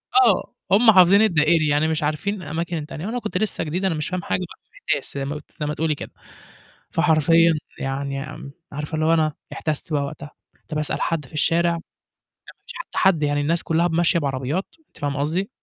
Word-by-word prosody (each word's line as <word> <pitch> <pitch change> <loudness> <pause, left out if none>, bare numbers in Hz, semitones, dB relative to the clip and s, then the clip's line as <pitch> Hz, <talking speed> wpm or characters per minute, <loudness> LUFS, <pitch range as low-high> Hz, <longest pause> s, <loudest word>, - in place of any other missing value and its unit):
آه، 245 -6 +4 0.2
هم 220 +3 +7
حافظين 190 +1 +7
الدائري 160 -5 +3
يعني 145 +2 +2
مش 160 -1 -1
عارفين 170 +7 -1
الأماكن 165 +2 -3
التانية 155 +3 -6
وأنا 240 +3 -2
كنت 215 -3 -3
لسه 215 - -1
جديد، 175 +5 -2
أنا 175 -4 +1
مش 155 +2 -3
فاهم 185 -1 -2
حاجة - - -1
بقى 180 - -8
ومِحتاس 145 -4 -3
زي 140 -1 -3
ما 145 +2 -4
ت - - -17 0.2
زي 150 - -1
ما 150 - -1
تقولي 155 -1 0
كده، - - -8 0.8
فحرفيًا 165 0 +4 0.3
يعني 135 0 -3
أم 140 - -9 0.2
عارفة 150 +2 -4
اللي 155 0 0
هو 165 - +4
أنا 155 -2 +2 0.2
احتَست 155 0 -3
بقى 145 -1 +1
وقتها، 145 +1 -7 0.4
طَب 155 - -3
اسأل 150 - -1
حد 165 -4 -1
في 130 - -19
الشارع؟ 170 +3 +2
ما 170 - -3 0.9
فيش - - -9 0.2
حد، 175 -6 +3
يعني 145 0 +1
الناس 165 +3 +1
كلّها 165 +2 +2
ب 165 - -4
ماشية 170 0 +3
بعربيات، 140 +5 -2 0.2
أنتِ - - -24
فاهمة 145 -2 -2
قصدي 170 - -1
160 Hz, 205 wpm, -22 LUFS, 150-175 Hz, 0.9 s, هم